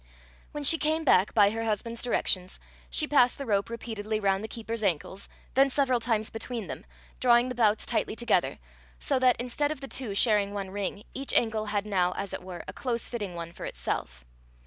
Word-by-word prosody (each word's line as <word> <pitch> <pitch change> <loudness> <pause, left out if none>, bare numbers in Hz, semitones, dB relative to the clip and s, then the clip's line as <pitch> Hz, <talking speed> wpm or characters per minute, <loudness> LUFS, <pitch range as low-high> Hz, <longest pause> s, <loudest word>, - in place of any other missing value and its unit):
When 295 - -5
she 325 +3 +6
came 315 +1 +1
back, 200 -9 +4
by 205 -2 +6
her 225 +1 -3
husband's 225 +1 -2
directions, 185 -6 0 0.3
she 305 - +1
passed 250 -4 +4
the 275 - -5
rope 200 -3 +1
repeatedly 220 -2 -4
round 195 -1 +1
the - - -3
keeper's 230 0 -5
ankles, 190 0 -2 0.2
then 270 +1 +5
several 260 -2 +2
times 225 -2 0
between 225 -1 -4
them, - - -7 0.3
drawing 240 0 +4
the - - -3
bouts 220 -3 +2
tightly - - -1
together, 235 +1 +1 0.4
so 275 -2 0
that, 255 -1 +4
instead 250 +5 -1
of 310 - -4
the 270 - -7
two 245 -7 -2
sharing 205 -2 +2
one 195 -2 -4
ring, 200 +1 -3
each 275 +1 -2
ankle 220 -2 +2
had 205 0 -1
now, 180 -3 +1
as 195 +1 -5
it - - -4
were, 180 -2 -8
a - - -6
close 240 -3 -2
fitting 205 -7 -4
one 170 0 -6
for - - -7
itself. - - -4
220 Hz, 200 wpm, -28 LUFS, 200-250 Hz, 0.4 s, she